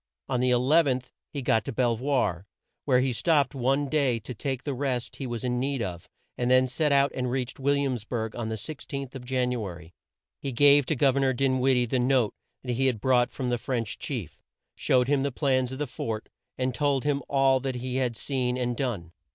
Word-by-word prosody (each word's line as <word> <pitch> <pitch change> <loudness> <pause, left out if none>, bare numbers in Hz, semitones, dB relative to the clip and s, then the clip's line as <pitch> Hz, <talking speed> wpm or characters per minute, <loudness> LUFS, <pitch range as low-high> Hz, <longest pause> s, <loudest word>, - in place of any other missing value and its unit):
On 130 -2 0
the 125 +1 +2
11th 130 +1 +3 0.2
he 140 -3 -4
got 110 -3 +2
to - - -3
Bel 120 -1 +1
voir, 115 - 0 0.4
where 130 -3 +4
he 130 -1 0
stopped 145 +1 +2
one 135 +2 +1
day 135 -5 +2
to 120 +4 -7
take 130 +2 -3
the 145 - -2
rest 125 -3 -2
he 135 - -4
was 120 -2 -4
in 125 -1 0
need 135 -1 -1
of, 90 -4 -6 0.3
and 120 0 +1
then 130 0 +5
set 150 +4 0
out 140 0 +4
and 125 -1 -2
reached 125 0 -3
Will 140 +1 +2
iams 130 -6 -1
burg 110 -1 -3
on 115 -2 -3
the 110 - -2
16th 135 +2 -7
of 130 -2 -8
Jan 125 -1 0
u 120 -3 -2
a 95 -4 -5
ry. 85 0 -14 0.5
He 140 - -3
gave 140 +2 +5
to 155 - +1
Gov 135 0 +3
er - - +3
nor 135 -1 +2
Din 130 0 +1
wid 130 +1 +3
die 125 0 +2
the 125 +2 0
note 125 -3 +2 0.3
he 130 +1 0
had 125 -4 0
brought 125 +1 +3
from 125 -2 -3
the 120 - 0
French 115 -4 -3
chief, - - -5 0.3
showed 125 -1 +2
him 140 -1 +2
the 140 +1 0
plans 130 -2 +1
of 130 - -5
the 150 - -1
fort, 110 -4 -5 0.3
and 130 0 -1
told 140 -1 +1
him 145 -1 0
all 135 -1 +3
that 130 -1 -3
he 125 +1 -3
had 125 -3 -1
seen 125 -3 -1
and 125 -1 -1
done. 110 -11 -3
130 Hz, 230 wpm, -27 LUFS, 120-135 Hz, 0.5 s, then